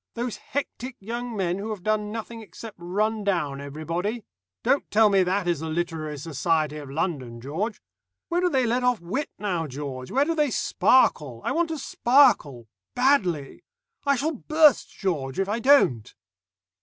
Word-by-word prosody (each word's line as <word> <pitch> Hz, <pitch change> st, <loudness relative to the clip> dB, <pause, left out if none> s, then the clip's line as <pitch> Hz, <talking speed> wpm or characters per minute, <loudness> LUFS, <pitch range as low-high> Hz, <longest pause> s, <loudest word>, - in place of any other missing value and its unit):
Those 240 Hz, -1 st, -3 dB
hectic 260 Hz, -2 st, -5 dB
young 235 Hz, +2 st, -5 dB
men 180 Hz, -1 st, -1 dB
who 210 Hz, +3 st, -5 dB
have 210 Hz, -5 st, -5 dB
done 215 Hz, -1 st, 0 dB
nothing 225 Hz, +1 st, -6 dB
except 220 Hz, 0 st, -10 dB
run 210 Hz, +5 st, -1 dB
down 150 Hz, -9 st, -1 dB
everybody! 165 Hz, +10 st, -4 dB, 0.4 s
Don't 280 Hz, -, +1 dB
tell 215 Hz, +1 st, +5 dB
me 195 Hz, -1 st, +4 dB
that 185 Hz, +1 st, 0 dB
is 170 Hz, -4 st, +1 dB
the 160 Hz, +1 st, -4 dB
literary 160 Hz, -2 st, -3 dB
society 155 Hz, +1 st, -1 dB
of 145 Hz, -2 st, -8 dB
London, 135 Hz, -6 st, -3 dB
George. 165 Hz, -, -3 dB, 0.5 s
Where 350 Hz, +1 st, 0 dB
do 360 Hz, -, +3 dB
they 265 Hz, -5 st, +2 dB
let 245 Hz, +2 st, 0 dB
off 250 Hz, -3 st, +2 dB
wit 205 Hz, -, -3 dB
now, 180 Hz, -6 st, -2 dB
George? 135 Hz, -2 st, -6 dB
Where 275 Hz, +3 st, +2 dB
do 330 Hz, -, 0 dB
they 300 Hz, -3 st, +1 dB
sparkle? 150 Hz, -, +2 dB
I -, -, 0 dB
want 335 Hz, 0 st, +1 dB
to 320 Hz, -, -3 dB
sparkle. 235 Hz, -, +3 dB, 0.3 s
Badly. 195 Hz, -, +1 dB, 0.4 s
I 280 Hz, -1 st, +3 dB
shall 295 Hz, +5 st, 0 dB
burst, 305 Hz, +1 st, +3 dB
George, 145 Hz, -8 st, -3 dB
if 195 Hz, -, +1 dB
I 215 Hz, +3 st, -1 dB
don't." 220 Hz, -, +4 dB
200 Hz, 170 wpm, -25 LUFS, 155-245 Hz, 0.5 s, tell